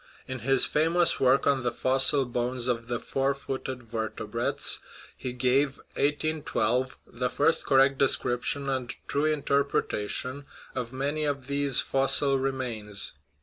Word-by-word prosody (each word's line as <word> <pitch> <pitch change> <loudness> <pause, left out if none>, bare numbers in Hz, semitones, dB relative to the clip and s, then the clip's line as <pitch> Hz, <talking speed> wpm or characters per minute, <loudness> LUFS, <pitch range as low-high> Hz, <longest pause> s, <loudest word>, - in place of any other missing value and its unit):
In 130 -1 -6
his 135 +2 +6
famous 165 +3 +2
work 130 +1 +3
on 140 -2 +2
the 120 -1 -1
fossil 135 +3 +3
bones 125 0 -2
of 115 -2 -2
the 120 -1 -3
four 135 +2 -2
footed 130 -2 -6
vertebrates 110 -2 -2 0.4
he 125 - -6
gave 130 +3 0 0.2
(1812) 140 -5 -1
the 125 +1 -4
first 150 +5 +1
correct 135 0 +3
description 135 +1 +1
and 130 -3 -3
true 145 +2 -1
interpretation 140 -3 -1 0.3
of 125 -2 -5
many 140 +4 -2
of 140 -3 -3
these 140 -1 +4
fos 135 0 +3
sil 135 -2 +2
remains. 120 -7 -3
135 Hz, 135 wpm, -26 LUFS, 125-140 Hz, 0.4 s, his